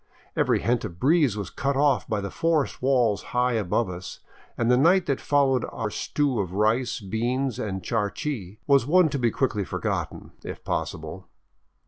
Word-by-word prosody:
Every - - +2
hint 120 0 +1
of 85 0 -7
breeze 145 - +3
was 100 -3 -5
cut 140 -1 -1
off 140 -2 +2
by 110 -3 -1
the 100 - -5
forest 165 -4 0
walls 125 -6 +2 0.2
high 125 0 +3
above 110 0 0
us, 90 -1 -7 0.4
and 115 +1 +2
the - - +6
night 175 +8 +4
that 140 - -1
followed 135 -4 +2
our 110 -2 -3
stew 140 +2 -1
of 90 -3 -2
rice, 115 +4 +1
beans, 120 +5 -2
and 95 -3 -3
charqui 110 -2 -3
was 140 -3 +4
one 180 +1 +5
to 140 -1 -2
be 120 -1 +2
quickly 115 -4 0
forgotten - - -4
— - - -30
if - - -7
possible. 80 +4 -4
120 Hz, 175 wpm, -25 LUFS, 105-140 Hz, 0.4 s, the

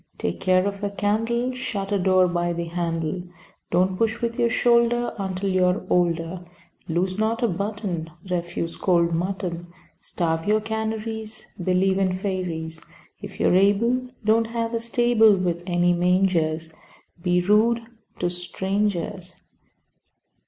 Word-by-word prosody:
Take 85 - -3
care 185 0 +3
of 200 0 -3
a 205 - 0
candle. 225 +5 0
Shut 205 -6 -4
a 200 - +2
door 185 0 +4
by 175 0 -1
the 170 0 -3
handle, 165 0 -2 0.5
Don't 185 +2 +2
push 225 +2 0
with 235 0 -2
your 235 - +3
shoulder 240 0 +3
Until 190 0 -2
you 185 0 +2
are 180 +1 0
older. 175 0 +1 0.5
Lose 185 +4 0
not 225 +2 0
a - - +4
button. 200 -4 -3 0.2
Refuse 170 -2 -3
cold 170 -2 +2
mutton. 175 0 -3 0.3
Starve 165 0 -2
your 215 +1 +4
canaries. 220 0 -4
Believe 190 +2 +2
in 185 -1 +1
fairies. 175 -4 -3 0.4
If - - -9
you - - +3
are - - +3
able, 230 +7 +3 0.2
Don't 225 +1 +3
have 230 0 -3
a 230 - 0
stable 230 -2 +4
With 175 -2 -1
any 175 0 +3
mangers. 175 -3 +1 0.5
Be 180 0 +2
rude 215 +5 +3 0.4
to 175 -1 -1
strangers. 190 0 -2
190 Hz, 140 wpm, -24 LUFS, 175-220 Hz, 0.5 s, door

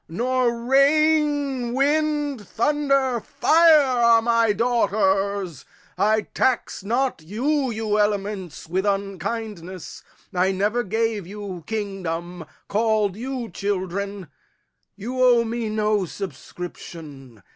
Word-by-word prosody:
Nor 240 +4 0
rain, 285 -2 +2
wind, 290 - 0
thunder, 275 0 +1
fire 310 +5 +5 0.2
are 235 -1 +6
my 230 -2 +3
daughters. 200 - 0 0.3
I 215 +1 +2
tax 240 -3 -1
not 245 -1 0
you, 260 - -1
you 215 -2 -1
elements, 200 -5 -2
with 185 +3 -1
unkindness. 195 -2 -4 0.3
I 185 +1 +2
never 210 +5 0
gave 220 -2 -1
you 195 -3 -7
kingdom, 180 -5 -4 0.2
call'd 215 -2 +1
you 250 0 -5
children, 200 -2 -3 0.7
You 245 +6 -2
owe 240 -2 +5
me 230 -1 -3
no 215 -2 +1
subscription. 155 - -9
215 Hz, 100 wpm, -23 LUFS, 195-250 Hz, 0.7 s, are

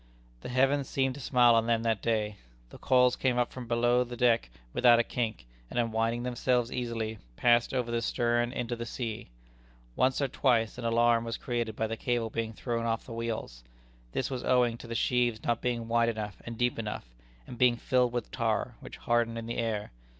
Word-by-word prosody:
The - - -7
heavens 135 +2 +2
seemed 135 -1 0
to 140 - -9
smile 125 -2 +5
on 115 0 +3
them 115 -1 +1
that 115 -3 0
day. 105 -3 -1 0.3
The - - -12
coils 125 -1 +4
came 125 -2 0
up 120 - 0
from 125 -2 -7
below 120 +1 +3
the 120 0 -8
deck 115 - +3 0.2
without 120 -1 +6
a 120 - +3
kink, 110 - -3 0.2
and - - -6
unwinding 115 0 0
themselves 125 -1 0
easily, 115 -3 -3 0.2
passed 120 - +3
over 125 -3 -1
the 115 0 0
stern 120 +1 +1
into 120 -2 -3
the 115 0 -6
sea. 115 - -5 0.7
Once 130 0 +2
or 140 - +1
twice 125 -4 +1
an 120 - -5
alarm 115 0 +3
was 115 0 -4
created 120 -3 -3
by 110 - -1
the 110 +1 -3
cable 120 -3 -1
being 115 0 -2
thrown 115 0 -2
off 115 0 -1
the 120 - -8
wheels. 115 - -4 0.5
This 130 - -2
was 130 -2 -3
owing 125 -2 +3
to - - -10
the 115 - -5
sheaves 120 -2 +1
not 120 -1 0
being 120 -2 -2
wide 115 0 +3
enough 105 -2 -5
and 115 -1 -6
deep 125 -1 0
enough, 105 - -4 0.4
and 120 - -10
being 125 -1 +5
filled 125 -1 +2
with 120 -2 -4
tar, - - -1
which - - -10
hardened 120 -1 0
in 115 - -5
the 115 - -4
air. 110 -3 -2
120 Hz, 205 wpm, -29 LUFS, 115-125 Hz, 0.7 s, without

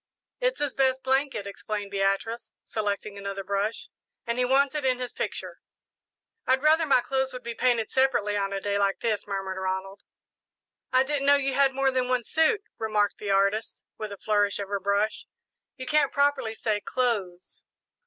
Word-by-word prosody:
"It's - - +1
his 290 -2 -1
best 265 -1 +1
blanket," 265 -5 0
explained 200 0 -5
Beatrice, 200 +4 -1
selecting 205 -1 -3
another 195 0 -4
brush, 200 +3 -2 0.4
"and 235 0 -2
he 250 - +3
wants 275 +2 +3
it 300 -2 -2
in 255 -1 +2
his 250 -1 -5
picture." - - -5 0.9
"I'd 265 +2 +3
rather 315 +1 +4
my 265 -3 +5
clothes 265 +1 -1
would 250 0 -7
be 235 0 -4
painted 235 -1 +1
separately 260 -6 +2
on 200 -1 -1
a 195 - -2
day 200 0 -1
like 200 -1 +1
this," 220 -3 -1
murmured 195 -1 -3
Ronald. 190 +1 -3 0.9
"I 255 0 +5
didn't 280 0 -1
know 285 - +7
you 275 -1 0
had 270 0 +3
more 270 0 +2
than 255 -1 0
one 250 -1 +1
suit," 320 - +2 0.2
remarked 215 -2 0
the 205 - -5
artist, 200 +3 +1 0.2
with 215 -1 -5
a 200 - -7
flourish 205 -1 +1
of 200 -1 -5
her 200 0 -1
brush; 200 +2 0 0.5
"you 260 - -6
can't 300 0 +2
properly 280 -6 +1
say 215 -2 -1
'clothes.'" 200 -9 -2
225 Hz, 180 wpm, -27 LUFS, 200-265 Hz, 0.9 s, know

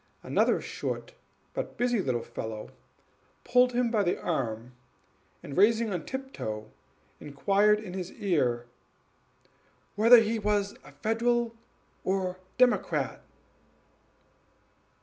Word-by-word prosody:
Another - - +2
short - - -5 0.4
but - - -5
busy 240 -3 +1
little 125 -7 -1
fellow 110 -1 -6 0.7
pulled 250 0 +4
him 240 -1 +1
by 220 -3 +2
the 175 -3 0
arm, 120 -7 -2 0.7
and, 140 - -7
rising 220 +2 +4
on 175 -3 -4
tiptoe, 110 - -5 0.5
inquired 200 +9 +2
in 200 -4 -8
his 185 -1 -5
ear, 130 -11 0 1.3
"Whether 230 +4 +8
he 225 0 0
was 205 -1 0 0.3
Federal 235 +1 +1 0.5
or 185 -1 -1 0.2
Democrat?" 250 0 +2
205 Hz, 100 wpm, -28 LUFS, 155-235 Hz, 1.3 s, Whether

